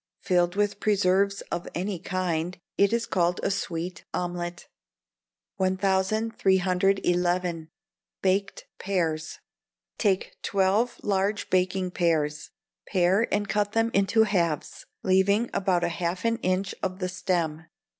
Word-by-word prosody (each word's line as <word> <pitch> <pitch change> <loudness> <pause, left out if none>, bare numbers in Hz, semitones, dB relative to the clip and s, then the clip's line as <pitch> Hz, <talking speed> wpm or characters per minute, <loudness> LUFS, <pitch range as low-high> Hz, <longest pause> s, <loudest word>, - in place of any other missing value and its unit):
Filled 175 0 +1
with 205 0 0
preserves 200 -1 +2
of 175 - -3
any 185 +1 -2
kind, 180 -1 -2 0.2
it 200 0 +3
is 230 0 +1
called 175 -3 +1
a - - +1
sweet 175 -2 -3
omelette." 175 -1 -4 0.9
1311. 190 -3 +1 0.5
Baked 195 +1 0
Pears. 165 -5 -1 0.6
Take 195 -4 0
twelve 200 +5 +1
large 200 +1 0
baking 185 0 +1
pears; 150 -4 0 0.4
pare 190 +4 +2
and 205 0 0
cut 205 0 0
them 225 0 +2
into 200 +3 +4
halves, 170 -8 -1 0.2
leaving 190 +3 +3
on 240 - -7
about 185 -3 +1
half 170 +3 -2
an 230 0 +2
inch 185 -2 -1
of 185 -1 -2
the 185 -1 -2
stem. 170 -4 -2
185 Hz, 115 wpm, -26 LUFS, 175-200 Hz, 0.9 s, into